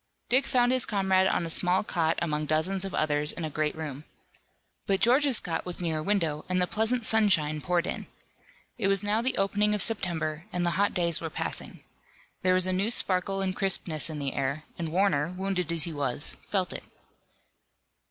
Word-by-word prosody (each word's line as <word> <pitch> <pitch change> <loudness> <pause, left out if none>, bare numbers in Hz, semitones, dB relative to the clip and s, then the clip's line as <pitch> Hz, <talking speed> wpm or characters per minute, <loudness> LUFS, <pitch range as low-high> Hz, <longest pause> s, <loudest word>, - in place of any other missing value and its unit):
Dick 260 +3 +3
found 245 -1 +3
his 255 -1 +1
comrade 190 -2 +2
on 175 - 0
a - - -4
small 180 +3 +1
cot 165 -5 0
among 150 -2 -2
dozens 180 +5 0
of 195 - -3
others 150 -1 +1
in 165 - -5
a 155 - -5
great 155 +1 -1
room. 150 -3 -6 0.8
But 195 -1 +2
George's 260 +2 +4
cot 165 -3 -3
was 180 -1 -5
near 165 -3 -1
a - - -4
window 160 -6 0
and 185 0 +1
the 180 - +3
pleasant 220 +4 0
sunshine 185 -10 +2
poured 175 +1 0
in. - - -4 0.7
It 200 - +1
was 195 0 +1
now 210 +2 +1
the 255 +2 -1
opening 205 +2 +2
of 210 - 0
September, 170 -7 -1
and 180 -1 -1
the 175 - +1
hot 200 +3 +1
days 170 -2 +2
were 165 - -3
passing. - - -5 0.6
There 185 0 +3
was 185 0 +4
a 185 - 0
new 195 +4 0
sparkle 195 -3 +1
and 185 -1 -2
crispness 170 -5 +1
in 155 - -5
the 140 -2 -2
air, 140 +3 -2
and 165 -2 -4
Warner, 180 -3 +1
wounded 185 -3 -2
as 165 -2 +2
he 170 - 0
was, 140 -1 -2
felt 185 -4 -1
it. - - -5
180 Hz, 200 wpm, -28 LUFS, 155-195 Hz, 0.8 s, George's